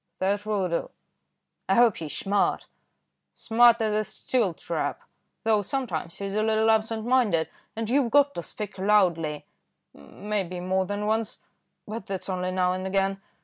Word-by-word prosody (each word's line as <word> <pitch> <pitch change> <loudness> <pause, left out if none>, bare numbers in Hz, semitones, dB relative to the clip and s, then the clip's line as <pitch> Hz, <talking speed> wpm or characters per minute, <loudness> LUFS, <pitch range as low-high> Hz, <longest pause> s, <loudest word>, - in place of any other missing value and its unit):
"That 200 +2 -1
will 200 -3 0
do." 170 -1 -2 0.8
"I - - +4
hope 235 -3 +5
he's 155 -3 -5
smart." 200 +1 0 0.7
"Smart 235 0 +4
as 215 -1 0
a 215 0 +1
steel 215 -4 -1
trap, - - -3 0.4
though 220 -2 +3
sometimes 185 - -3
he's 200 -1 -4
a 215 - +1
little 220 0 +3
absent 220 0 0
minded; 235 -10 +2 0.3
and 225 0 -3
you've 255 +1 +2
got 285 +3 +4
to - - -4
speak 210 +2 -7
loudly, 175 -7 +2 0.5
maybe 185 - -4
more 185 +1 0
than 205 +1 -3
once, 220 0 -1 0.5
but 215 -1 -6
that's 195 0 -5
only 185 -1 -1
now 185 0 +1
and 185 +1 -3
again. 195 0 0
205 Hz, 155 wpm, -26 LUFS, 185-220 Hz, 0.8 s, hope